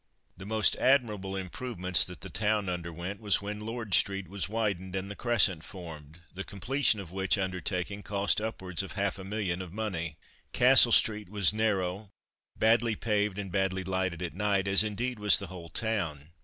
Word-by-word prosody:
The 95 +2 -10
most 110 0 +2
admirable 105 -8 +2
improvements 95 -1 0
that 90 - -10
the 95 - -7
town 105 +2 0
underwent 85 +2 -5
was 105 -2 +3
when 105 +1 -5
Lord 110 -1 -5
street 95 0 +2
was 100 0 -3
widened 100 -4 -2
and 95 +1 -3
the - - -7
Crescent 105 -9 +2
formed, 80 -4 -10
the 95 +2 -5
completion 115 +3 +1
of 95 -4 -8
which 95 +2 +1
undertaking 95 +1 -3
cost 100 +1 +1
upwards 95 -5 -3
of 95 - -7
half 100 -1 -1
a - - -7
million 95 -3 -2
of 90 -3 -8
money. 85 -7 -4 0.4
Castle - - +7
street 105 -4 +3
was 100 -1 +3
narrow, 100 -2 -1 0.5
badly 115 0 +3
paved, 105 -2 0
and 100 -2 -5
badly 95 0 0
lighted 95 -1 -2
at 85 - -4
night, 100 0 0
as, 95 +2 +6
indeed, 115 +3 -3
was 105 0 +5
the 100 - -5
whole 85 -2 -9
town. 85 -9 -3
100 Hz, 175 wpm, -29 LUFS, 90-105 Hz, 0.5 s, Castle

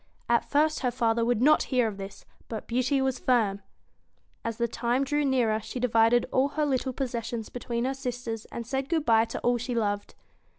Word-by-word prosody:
At 235 0 +3
first 305 +2 +2
her 255 - +1
father 230 -2 +1
would 240 0 +1
not 305 +2 +6
hear 250 -3 +3
of 205 -3 -5
this, 195 0 -9 0.2
but 220 -2 -5
Beauty 255 +3 +1
was 265 -1 -1
firm. 215 -6 +1 0.8
As 230 -1 -3
the 235 - +1
time 240 +3 0
drew 295 +2 0
near 240 -5 +2
she 250 - -6
divided 235 0 +3
all 260 +2 +3
her 305 - +2
little 265 -2 0
possessions 240 -3 -4
between 240 -1 -3
her 265 - 0
sisters, 245 -4 -5
and 235 - -7
said 270 +3 -3
good 320 -3 0
bye 225 -2 +5
to 225 - -5
all 245 0 +2
she 245 +1 -3
loved. 205 -3 -1
245 Hz, 200 wpm, -27 LUFS, 230-265 Hz, 0.8 s, not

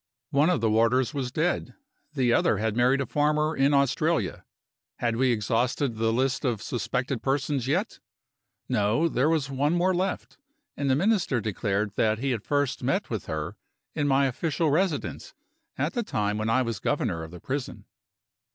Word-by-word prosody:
One 145 +4 +3
of 180 - +1
the 115 - +2
warders 115 +5 +2
was 130 -4 -3
dead. 160 +6 -1 0.4
The 125 -3 +2
other 110 - +3
had 110 +1 -1
married 125 +3 +3
a - - -1
farmer 150 +3 +1
in 135 +1 +3
Australia. 140 +4 +1 0.5
Had 115 -1 -1
we 130 +1 +2
exhausted 120 +4 0
the 115 0 +1
list 130 +3 0
of 120 -6 0
suspected 125 +3 -2
persons 135 -1 -1
yet? 180 +11 -1 0.7
No: 105 +11 +2
there 140 -1 +1
was 150 -4 0
one 145 +4 +1
more 180 +2 +2
left; 185 +1 -3 0.4
and 140 -1 -1
the 130 - +4
Minister 180 - +1
declared 105 -1 -1
that 110 0 +2
he 135 +4 -1
had 115 -4 -1
first 145 +2 -1
met - - -1
with - - -4
her 75 -1 -4 0.4
in 145 - 0
my 140 0 +3
official 155 +4 0
residence, 185 - -1 0.4
at - - -1
the 240 - 0
time 105 - -1
when 110 +1 -1
I 130 +3 +3
was 115 -4 -3
Governor 100 - -1
of 80 - -7
the 90 +1 -10
prison. 135 - -5
130 Hz, 175 wpm, -26 LUFS, 115-150 Hz, 0.7 s, the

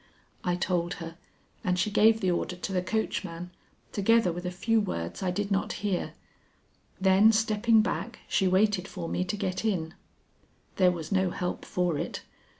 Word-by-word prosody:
I 175 -1 +1
told 175 -1 -1
her, 165 -1 -8 0.5
and 180 -1 +1
she 195 +4 0
gave 220 +2 +5
the 185 -2 +2
order 175 +1 -2
to 185 +2 -5
the 180 - +1
coachman, 180 -4 -3 0.4
together 215 -1 +3
with 175 +2 -6
a - - 0
few 220 +5 +1
words 85 - -4
I 190 - 0
did 200 +3 -2
not 195 0 0
hear; 195 -3 -1 0.8
then 190 +3 +6
stepping 220 0 +3
back 195 +3 -3
she 190 - +2
waited 195 0 +2
for 175 -4 -6
me 180 - -1
to 185 +3 -3
get 190 -1 -2
in. 175 -7 -1 0.8
There 185 -2 +5
was 165 -3 -6
no 190 -1 +2
help 180 0 -4
for 175 -4 0
it. - - -4
185 Hz, 170 wpm, -28 LUFS, 180-210 Hz, 0.8 s, then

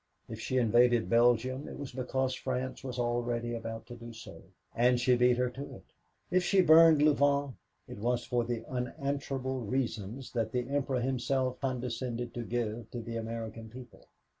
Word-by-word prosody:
If 110 -1 -7
she 130 +3 -2
invaded 120 0 +4
Belgium 120 +3 +3
it - - -8
was 140 -2 -6
because 130 +1 -1
France 130 0 -3
was 130 -2 -5
already 120 0 -1
about 115 -1 -5
to 120 - -9
do 115 0 -10
so, 115 - -11 0.3
and 125 +1 +4
she 125 +1 +4
beat 125 0 +4
her 125 0 0
to 135 +3 -8
it. - - -14 0.5
If 185 0 +3
she 190 +1 +4
burned 160 -2 +7
Louvain, 145 -2 +3 0.3
it - - -9
was 120 +2 0
for 120 -1 0
the 115 -1 -3
unanswerable 130 +1 -3
reasons 115 0 -3
that 115 -3 -2
the 125 -1 -1
Emperor 135 -2 0
himself 130 0 -1
condescended 125 -2 -3
to 120 - -4
give 115 -1 -3
to 120 - -5
the 115 0 -6
American 115 0 -5
people. 125 +2 -13
125 Hz, 170 wpm, -31 LUFS, 115-130 Hz, 0.5 s, burned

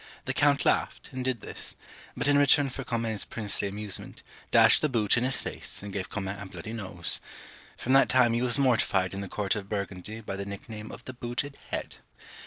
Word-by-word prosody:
The - - -1
count - - +3
laughed, - - 0
and 130 0 -4
did 125 -4 -1
this; - - -3 0.4
but - - +1
in 145 - +5
return 140 -1 +4
for 135 - -5
Comines's 115 -4 0
princely 105 -2 -1
amusement, 100 0 -2 0.3
dashed - - +7
the 155 - +2
boot 110 -5 +3
in 120 - +1
his 130 0 +3
face, - - -5
and 100 -1 -7
gave 95 -2 -3
Comines 100 0 -4
a - - -6
bloody 90 +4 -8
nose, 95 -6 -1 0.6
From 130 - 0
that 135 0 +6
time 125 -2 +4
he 120 - +1
was 125 0 +3
mortified 115 -8 +2
in 100 - -4
the 100 - -6
court 105 +1 0
of 100 -2 -6
Burgundy 100 +1 -4
by 100 -3 -6
the 100 - -3
nickname 105 +2 -8
of - - -11
the 130 - -7
booted 120 +3 -3
head. - - -4
110 Hz, 205 wpm, -28 LUFS, 100-125 Hz, 0.6 s, dashed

